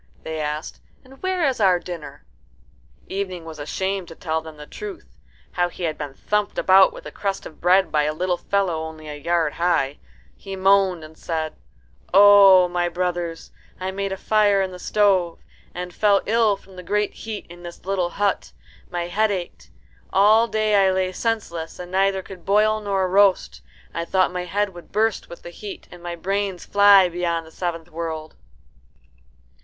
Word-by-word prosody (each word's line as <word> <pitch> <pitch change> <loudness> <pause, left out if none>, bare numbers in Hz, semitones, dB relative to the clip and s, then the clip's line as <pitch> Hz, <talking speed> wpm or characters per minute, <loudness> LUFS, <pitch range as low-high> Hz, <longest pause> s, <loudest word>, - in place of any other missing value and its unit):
they 160 0 -5
asked; 150 +1 -4 0.2
"and 265 +1 -17
where 370 -4 +1
is 260 -3 -1
our 190 -4 +4
dinner?" 175 -3 -8 0.8
Evening 185 -3 -4
was 160 -2 -9
ashamed 190 +5 -3
to 165 - -11
tell 160 -1 -2
them 160 -1 -11
the 150 - -10
truth 400 - -8 0.5
how 175 0 0
he 175 - -9
had 160 -2 -1
been 145 -2 -7
thumped 210 +5 -1
about 190 0 +6
with - - -12
a - - -7
crust 195 -1 -3
of 155 - -12
bread 185 +2 +4
by 150 - +2
a 150 - +1
little 175 +3 -1
fellow 190 -5 0
only 160 -1 -8
a 150 - -6
yard 160 +1 0
high. 160 -5 0 0.4
He 195 -1 -8
moaned 190 -3 +3
and 155 +1 -12
said, 160 -1 -4 0.6
"O 195 -2 +8
my 175 0 -1
brothers, 175 -1 -3 0.3
I 185 +1 -3
made 195 0 -3
a 190 - -3
fire 205 0 +3
in 190 -1 -1
the 180 - -9
stove, 190 -4 +2 0.3
and 180 0 -6
fell 205 0 +3
ill 220 -2 +2
from 190 -1 -18
the - - -6
great 210 +3 -1
heat 220 -2 -7
in 175 0 -13
this 175 0 -11
little 185 -2 0
hut. 200 +1 -1 0.4
My 175 -1 -3
head 215 +5 +1
ached. 185 -4 -5 0.4
All 215 +4 +5
day 215 -3 +2
I 190 - +4
lay 185 0 0
senseless, 185 -7 -3
and 180 0 -8
could - - -14
neither 195 0 0
boil 210 +4 +2
nor 195 -2 0
roast. 195 0 +2 0.3
I 170 - -3
thought 185 0 +1
my 180 0 -3
head 200 +2 -1
would 175 -2 -13
burst 220 +1 0
with 170 - -11
the 175 - -8
heat, 200 +3 -9
and 175 - -12
my 175 0 -5
brains 195 +1 -2
fly 200 -2 +6
beyond 170 -1 -2
the 160 - -15
seventh 170 -1 -5
world." 160 -1 -5
185 Hz, 180 wpm, -22 LUFS, 170-200 Hz, 0.8 s, O